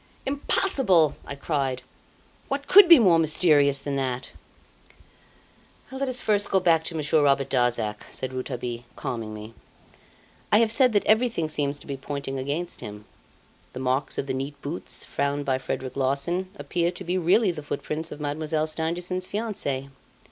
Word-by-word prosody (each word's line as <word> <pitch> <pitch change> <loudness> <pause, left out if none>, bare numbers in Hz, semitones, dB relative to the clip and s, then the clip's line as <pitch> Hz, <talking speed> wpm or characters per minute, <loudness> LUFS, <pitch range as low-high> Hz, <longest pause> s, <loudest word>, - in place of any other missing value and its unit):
"Impossible!" 265 - +2
I 140 - -5
cried, 140 -3 -2 0.6
"What 280 +1 -3
could 395 +3 +8
be 335 - +11
more 185 -9 +5
mysterious 150 -3 +4
than 140 -1 -2
that?" 130 -2 -3 1.6
"Let 265 0 -2
us 250 -1 -3
first 205 -1 +1
go 190 - +3
back 165 -3 +3
to 165 - -3
Monsieur 155 0 +2
Robert 140 -1 +2
Darzac," 120 -4 0
said 130 - -5
Rouletabille, 125 -2 -4
calming 115 -3 -4
me. 110 +1 -9 1.0
"I 210 - +6
have 225 0 +3
said 250 +1 +4
that 205 - +2
everything 220 -7 +2
seems 145 -2 -1
to - - -14
be 140 -2 -5
pointing 135 0 -5
against 145 +6 -4
him. 105 -2 -9 0.7
The - - -6
marks 130 +2 -1
of - - -1
the 135 - -3
neat 140 +2 -5
boots 150 +5 -3
found 140 0 -2
by 130 -1 0
Frederic 130 0 -4
Larsan 140 +8 -1
appear 170 -4 -1
to 180 +2 -7
be 185 +1 -1
really 190 +4 +3
the 160 -3 -7
footprints 155 +2 -4
of - - -8
Mademoiselle 155 +1 -1
Stangerson's 175 +3 -3
fiance. 195 - -3
150 Hz, 160 wpm, -25 LUFS, 135-185 Hz, 1.6 s, be